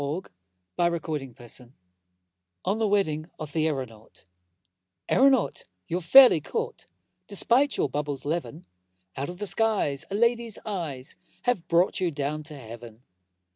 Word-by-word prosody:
Ambrose 160 -5 0
Bierce 120 +1 -8 1.0
On 200 +4 0
the 220 - +2
Wedding 165 -6 0
of 155 -2 -7
the 160 -1 +2
Aeronaut 120 -10 -6 0.8
AERONAUT, 265 -3 +3 0.2
you're 175 +2 -2
fairly 245 - +8
caught, 460 - -4 0.4
Despite 240 +7 +3
your - - +2
bubble's 145 -1 -4
leaven: 160 +1 -3 0.5
Out 140 +3 -3
of 175 - -7
the 205 - -4
skies 195 -8 +1
a 200 - -3
lady's 235 0 +1
eyes 160 -11 -5 0.3
Have 245 -9 0
brought 170 +2 +2
you 180 - +1
down 150 0 -3
to 150 -1 -8
Heaven! 115 -1 -11
165 Hz, 130 wpm, -26 LUFS, 145-210 Hz, 1.0 s, fairly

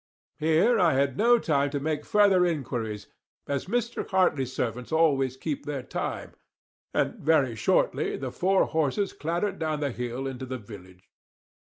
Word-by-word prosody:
Here 160 +10 +3
I 175 -5 +4
had 135 -1 +1
no 240 +6 +5
time 145 -9 +1
to 145 0 -2
make 150 +1 -2
further 200 -3 +4
inquiries, 120 - -2 0.4
as 140 +2 -2
Mr. 235 +3 -2
Hartley's 145 -9 +2
servants 125 0 -3
always 140 -5 +2
keep 145 +1 -4
their 140 -3 -3
time; - - -4 0.6
and - - -1
very 140 -6 +2
shortly 105 - +1
the - - -5
four 190 +1 +2
horses 160 +6 0
clattered 175 +5 -2
down 155 -2 -1
the 145 -2 -1
hill 125 +2 -4
into 130 -1 -5
the 130 0 -4
village. 95 -4 -13
145 Hz, 155 wpm, -27 LUFS, 130-175 Hz, 0.6 s, no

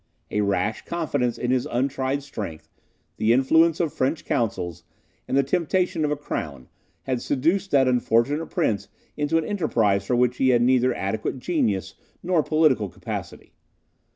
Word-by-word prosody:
A 105 - +1
rash 105 +2 0
confidence 145 -8 -1
in 125 - -1
his 130 -1 +1
untried 135 +2 -1
strength, 105 - -7 0.5
the 110 +1 +2
influence 160 +6 +4
of 165 -4 0
French 140 +4 -1
counsels, 95 - -2 0.4
and 135 - 0
the 140 - +4
temptation 175 +2 0
of 150 - +1
a 150 - 0
crown, 75 - -5 0.4
had 130 -2 -2
seduced 170 +8 0
that 135 -5 +4
unfortunate 125 +5 +1
prince 105 -3 -1 0.3
into 150 +2 +1
an 165 - 0
enterprise 115 - +1
for 120 - 0
which 125 0 +2
he 130 - +3
had 120 -1 +4
neither 130 0 +3
adequate 105 +6 -2
genius 125 - -1 0.3
nor 175 -3 +2
political 150 -10 +2
capacity. - - -7
130 Hz, 155 wpm, -24 LUFS, 115-155 Hz, 0.5 s, influence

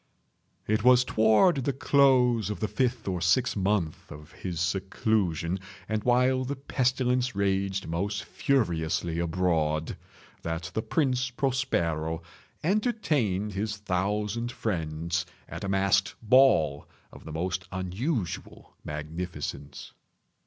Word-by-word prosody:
It 110 +1 0
was 125 0 +6
toward 110 - +4
the 135 +1 -1
close 125 -6 +3
of 105 - -4
the 110 - 0
fifth 120 +1 -1
or 90 -3 -1
sixth 100 +9 +2
month 95 -5 -1
of 75 +2 -11
his 90 -4 -5
seclusion, 95 -1 0 0.3
and 110 0 -1
while 125 +1 +3
the 140 +3 -3
pestilence 125 -2 0
raged 95 -1 0
most 100 +5 -2
furiously 85 - 0
abroad, 80 -3 0 0.4
that 80 +1 -4
the 110 - 0
Prince 130 -2 0
Prospero 85 - -1 0.4
entertained 150 - 0
his 105 +1 -2
thousand 105 +4 -1
friends 85 -5 -2 0.2
at - - -7
a 100 - -2
masked 95 0 +2
ball 110 - +4 0.3
of - - -12
the 80 - -8
most 90 +3 -2
unusual 95 - -3
magnificence. 75 -2 -6
100 Hz, 115 wpm, -28 LUFS, 85-125 Hz, 0.4 s, was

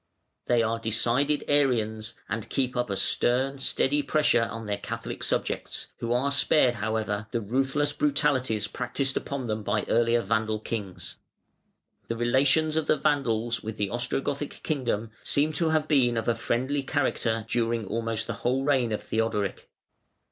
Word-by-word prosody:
They 120 -2 +3
are 115 +1 0
decided 120 +6 +1
Arians, 115 -6 +1
and 110 0 -4
keep 130 -2 -1
up 120 -2 -1
a 100 - -1
stern, 130 +6 +1
steady 140 +2 +1
pressure 145 -7 +2
on 115 -1 -6
their 100 -1 -2
Catholic - - -5
subjects, - - -2
who 115 - -3
are 130 +4 +2
spared, 140 -2 +4
however, 110 -1 -1
the 115 - -1
ruthless 135 +6 0
brutalities 135 -7 +1
practised 130 +3 -2
upon 140 -2 -3
them 110 -1 -2
by 105 0 0
the - - -6
earlier 115 0 +3
Vandal 110 +1 0
kings. 105 -4 -5 0.9
The 115 - -3
relations 135 +6 +3
of 160 -1 0
the - - +3
Vandals 120 -6 0
with 110 0 -6
the 100 -1 -1
Ostrogothic 135 +5 -2
kingdom 120 -7 -1
seem 150 +2 +1
to 160 +2 +1
have 155 -1 +1
been 125 -6 +3
of 115 - -2
a 120 - +4
friendly 125 +5 -1
character 125 -5 0
during 115 -1 0
almost 115 +1 -2
the - - -3
whole 130 +2 +1
reign 135 -5 +2
of 105 - -2
Theodoric. 110 -3 -2
120 Hz, 160 wpm, -27 LUFS, 110-140 Hz, 0.9 s, spared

